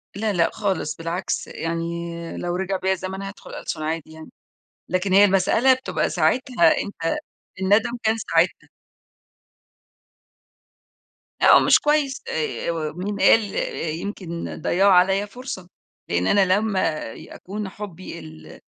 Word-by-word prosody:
لأ، 210 +1 -1
لأ 170 -3 +3
خالص 195 -7 -2
بالعكس، 170 +3 -3
يعني 165 0 -3 0.5
لو 175 0 -2
رجِع 190 +1 -1
بيَّ 190 +1 0
الزمن 190 +1 -3
هادخُل 195 0 -9
ألسُن 155 - -5
عادي 160 0 -3
يعني، 160 0 -12 0.6
لكن 185 +2 0
هي 200 +1 +8
المسألة 205 +7 +4
بتبقى 260 - -2
ساعتها 250 - +3
أنت 165 -5 -3 0.4
النَّدم 205 +5 +3
كان 220 +1 +2
ساعتها. - - 0 2.7
لأ - - +7
هو - - +6
مش - - +5
كويس 295 -2 +1
آآ، 160 +1 -2 0.2
مين 200 +2 -4
قال 225 - +6 0.6
يمكن 175 -4 -5
ضيّعوا 195 +5 +3
عليَّ 190 +3 +4
فرصة، 225 -6 -7 0.4
لإن 85 +1 +1
أنا 200 -1 +4
لما 190 -7 +1
ي - - -11
أكُون 200 +1 -6
حُبّي 190 -3 -8
ال 80 -1 -12
190 Hz, 130 wpm, -23 LUFS, 170-205 Hz, 2.7 s, هي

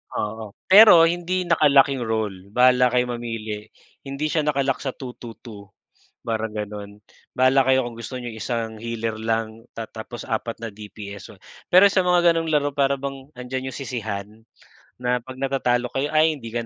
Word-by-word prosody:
Oo, 105 -1 -4 0.2
pero 200 -5 +9
hindi 175 +2 0
naka-lock 145 -5 +4
yung 125 -4 -3
role 110 -4 -2 0.2
bahala 125 0 +5
kayo 125 0 0
mamili 110 -3 -5 0.4
hindi 140 +3 -3
siya 165 - +1
naka-lock 140 -3 0
sa 135 -2 -4
2-2-2 115 -4 -10 0.5
parang 110 -1 -3
gano'n. 105 -1 -7 0.3
Bahala 130 +1 +3
kayo 130 -1 +2
kung 115 - -9
gusto 125 +2 -7
niyong 120 -2 -7
isang 115 0 -3
healer 115 0 -4
lang 110 0 -3
ta 115 -1 -7
tapos 115 +2 -9
4 115 +1 -3
na 115 - -5
DPS 100 -2 -10
so, - - -17 0.3
pero 185 +3 +8
sa 190 -1 +2
mga 175 -1 +4
ganong 165 -1 -1
laro 145 -2 +1
para 140 -1 +1
bang 135 0 -7
'andiyan 130 0 -5
yung - - -8
sisihan 110 -7 -4 0.7
na 125 0 -1
pag 130 +1 -11
natatalo 130 -2 0
kayo 140 +2 -1
ay 155 +1 +3
hindi 115 -6 -9
ka 115 0 -3
125 Hz, 170 wpm, -23 LUFS, 110-140 Hz, 0.7 s, pero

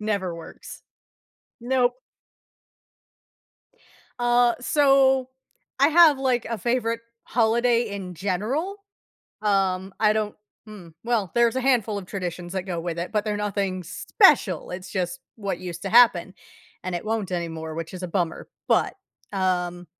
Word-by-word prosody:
Never 200 -5 -2
works. 165 - -11 0.8
Nope. 245 0 +2 2.3
Uh, 240 0 +3
so 265 -1 +3 0.5
I 280 - +5
have, 320 -3 +6
like, 255 -3 +1
a 230 0 -3
favorite 230 +1 -1 0.2
holiday 235 0 +2
in 195 -3 -6
general. 215 - -2 0.7
Um, 190 -2 +1
I 215 -1 +5
don't 215 -1 -2 0.3
hmm? 205 -5 -11 0.2
Well, 230 -6 0
there's 235 +1 +3
a - - +1
handful 240 -6 +1
of 185 - -8
traditions 175 -2 -5
that 190 - -1
go 180 -2 -4
with 170 0 -4
it, 170 - -4
but 210 -1 0
they're 210 -1 -1
nothing 200 -2 -2
special, 165 - +3
it's 185 +1 -7
just 190 +8 -3 0.2
what 200 -5 -3
used 175 -2 -7
to 195 - -4
happen, 210 -6 +5 0.5
and 185 -1 -4
it 175 - -4
won't 215 -4 -2
anymore, 160 -2 -4
which 165 0 -6
is 185 - -7
a - - -4
bummer, 170 -2 -2 0.2
but, - - +2 0.4
um 180 -2 -1
205 Hz, 140 wpm, -24 LUFS, 180-240 Hz, 2.3 s, have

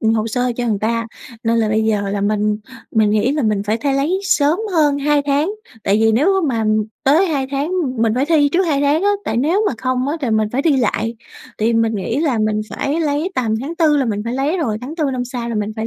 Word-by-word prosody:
ừm, 225 -1 +2
hồ 220 0 0
sơ 245 +2 -1
cho 240 -1 -1
người 210 -3 0
ta 230 +1 -1 0.4
nên 230 0 +2
là 220 -1 +1
bây 215 +1 +1
giờ 210 -2 0
là 200 0 -2
mình 210 +1 0 0.3
mình 220 -2 +2
nghĩ 215 +5 +2
là 295 -1 -1
mình 210 -3 +1
phải 210 +2 0
thấy 275 +4 -1
lấy 310 +8 0
sớm 325 -5 +2
hơn 295 -4 +3
2 290 0 +2
tháng, 290 +7 +1 0.3
tại 195 - +3
vì 225 0 +4
nếu 255 +9 +2
á 385 - +2
mà, 230 -5 0 0.4
tới 310 +8 +4
2 285 -6 -1
tháng 280 +3 -2 0.3
mình 225 -1 +2
phải 260 +3 0
thi 305 -3 +3
trước 370 +2 +3
2 285 -4 +1
tháng 290 +4 +2
á, 405 - +3
tại - - -2
nếu 330 - +2
mà - - -2
không 255 0 -1
á, 300 - -1
thì 260 -5 -1
mình 220 -1 +1
phải 270 +3 0
thi 310 -4 +3
lại. 230 -1 -1 0.4
Thì 225 +2 +1
mình 225 -1 +1
nghĩ 220 +7 -2
là 280 -8 +1
mình 215 0 0
phải 290 +4 -2
lấy 305 +3 -1
tầm 225 -4 0
tháng 305 +6 -5
4 315 -4 +3
là 275 - +2
mình 210 -3 -2
phải 230 - -3
lấy 285 +7 0
rồi, 225 -11 -1
tháng 285 +6 -7
4 315 - 0
năm 250 -1 -2
sau 245 -1 -5
là 235 - -3
mình 210 0 -2
phải 220 0 -2
250 Hz, 265 wpm, -18 LUFS, 220-295 Hz, 0.4 s, vì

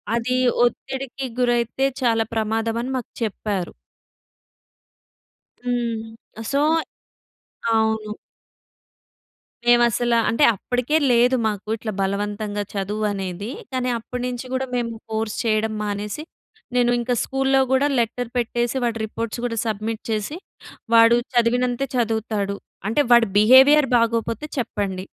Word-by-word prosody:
అది 250 +2 0 0.3
ఒత్తిడికి 265 +2 -4
గురైతే, 240 +2 +1 0.2
చాలా 225 -2 +2
ప్రమాదం 225 +1 -1
అని 260 - -4
మాకు 245 - -7
చెప్పారు. 200 -3 -3 1.9
హ్మ్. 235 -2 -2 0.5
సో 280 - +2 1.2
అవును. 220 -1 0 1.5
మేమసల 240 0 +4
అంటే 290 +6 +3
అప్పటికే 250 +8 -1 0.2
లేదు 245 +2 +4
మాకు, 210 0 -3
ఇట్లా 215 -1 -5
బలవంతంగా 205 +1 -2
చదువు 205 +2 -2
అనేది. 195 +2 -5 0.2
కాని 255 -1 -1
అప్పటి 245 +2 -6
నుంచి 250 +1 -5
కూడా 265 0 -1
మేము 235 -1 -1 0.2
ఫోర్స్ 220 0 -2
చేయడం 220 0 +1
మానేసి, 205 +6 -3 0.5
నేను 245 -1 +3
ఇంకా 245 +1 0
స్కూల్లో 270 0 +1
కూడా 270 +2 +3
లెటర్ 235 +1 -1
పెట్టేసి, 240 +1 0
వాటి 230 -1 -1
రిపోర్ట్స్ 230 +2 -5
కూడా 230 -1 -2
సబ్మిట్ 220 +1 -3
చేసి, 220 +9 -2 0.6
వాడు 230 +1 +7 0.2
చదివినంతే 245 +2 +2
చదువుతాడు. 220 -3 -1 0.3
అంటే 225 +7 +2
వాడి 235 -1 +7
బిహేవియర్ 265 +6 +7
బాగోకపోతే 230 +3 0
చెప్పండి. 195 -5 -2
230 Hz, 110 wpm, -22 LUFS, 215-245 Hz, 1.9 s, వాడు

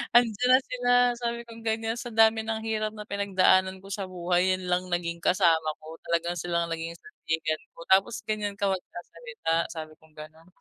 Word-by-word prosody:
'Andiyan 240 0 +4
na 255 - +8
sila," 245 -1 0 0.3
sabi 235 -1 -2
kong 230 0 -11
ganyan. 225 0 -1
"Sa 240 - -6
dami 220 0 +4
ng 220 0 -2
hirap 215 -1 -1
na 210 0 -8
pinagdaanan 190 -2 +2
ko 195 - -12
sa 195 -1 -3
buhay, 180 +1 +1
'yan 185 -1 -7
lang 180 +1 +2
naging 170 -1 -2
kasama 165 -3 +3
ko. 160 +1 -10
Talagang 170 +1 0
sila 170 0 0
ang - - -8
naging 165 +1 -6
sandigan 160 -1 -3
ko, - - -17
tapos 195 +4 +3
ganyan 210 -2 -2
ka 200 - +1
magsasalita," 190 - -4 0.2
sabi 155 -2 -7
kong 160 -1 -24
ganon, 155 +2 -12
190 Hz, 185 wpm, -27 LUFS, 170-220 Hz, 0.3 s, na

